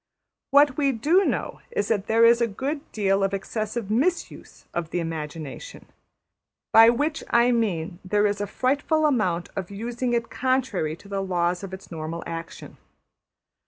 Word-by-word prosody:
What 285 Hz, -1 st, +5 dB
we 280 Hz, -2 st, +2 dB
do 310 Hz, -, +3 dB
know -, -, -2 dB
is 475 Hz, -2 st, -2 dB
that 205 Hz, -2 st, 0 dB
there 225 Hz, +1 st, +5 dB
is 235 Hz, +1 st, +5 dB
a 235 Hz, -, +3 dB
good 280 Hz, +8 st, -4 dB
deal 195 Hz, -2 st, +1 dB
of 195 Hz, 0 st, +1 dB
excessive 215 Hz, +1 st, -4 dB
mis 320 Hz, +11 st, +1 dB
use -, -, -15 dB
of 170 Hz, -2 st, -3 dB
the 175 Hz, -, -2 dB
imagination, 160 Hz, -, -6 dB, 0.9 s
by 225 Hz, +1 st, +9 dB
which 295 Hz, +7 st, 0 dB
I 235 Hz, +1 st, +4 dB
mean 185 Hz, -7 st, -1 dB
that 185 Hz, -, -14 dB
there 210 Hz, +1 st, +3 dB
is 205 Hz, 0 st, 0 dB
a 205 Hz, -, -2 dB
frightful 290 Hz, +6 st, +1 dB
amount 185 Hz, -, +1 dB
of 190 Hz, -3 st, -4 dB
using 240 Hz, +4 st, -3 dB
it 235 Hz, -1 st, -1 dB
contrary 240 Hz, -12 st, 0 dB
to 200 Hz, -, -17 dB
the 200 Hz, -1 st, -2 dB
laws 180 Hz, -1 st, -1 dB
of 195 Hz, -, -6 dB
its 190 Hz, 0 st, -10 dB
normal 165 Hz, +1 st, -5 dB
action. 165 Hz, 0 st, -8 dB
215 Hz, 170 wpm, -25 LUFS, 180-255 Hz, 0.9 s, by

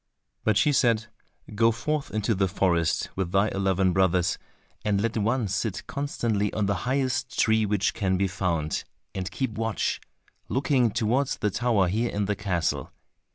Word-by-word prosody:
But 110 Hz, -2 st, +2 dB
she 150 Hz, -, +4 dB
said, 115 Hz, -4 st, +3 dB, 0.5 s
"Go 115 Hz, +2 st, +4 dB
forth 150 Hz, +6 st, -2 dB
into 110 Hz, +1 st, 0 dB
the 95 Hz, -1 st, +1 dB
forest 85 Hz, -3 st, +1 dB
with 95 Hz, -2 st, -2 dB
thy 100 Hz, +2 st, +3 dB
eleven 95 Hz, -2 st, +1 dB
brothers, 90 Hz, -2 st, +2 dB, 0.4 s
and 105 Hz, -2 st, +1 dB
let 115 Hz, +2 st, -1 dB
one 115 Hz, +2 st, +1 dB
sit 105 Hz, +1 st, -2 dB
constantly 115 Hz, -7 st, -1 dB
on 105 Hz, -, 0 dB
the 100 Hz, -, +1 dB, 0.2 s
highest 130 Hz, -1 st, -1 dB
tree 110 Hz, -1 st, +3 dB
which 100 Hz, -2 st, +1 dB
can 95 Hz, -2 st, 0 dB
be 95 Hz, +1 st, +1 dB
found, 85 Hz, -5 st, -1 dB, 0.3 s
and 95 Hz, -1 st, -3 dB
keep 120 Hz, +6 st, -2 dB
watch, 115 Hz, -2 st, -1 dB, 0.5 s
looking 130 Hz, -3 st, +2 dB
towards 120 Hz, +6 st, 0 dB
the 105 Hz, -, 0 dB
tower 110 Hz, -4 st, +2 dB
here 115 Hz, +6 st, 0 dB
in 100 Hz, 0 st, -1 dB
the 105 Hz, +1 st, 0 dB
castle. 95 Hz, -5 st, -1 dB
105 Hz, 160 wpm, -26 LUFS, 95-115 Hz, 0.5 s, she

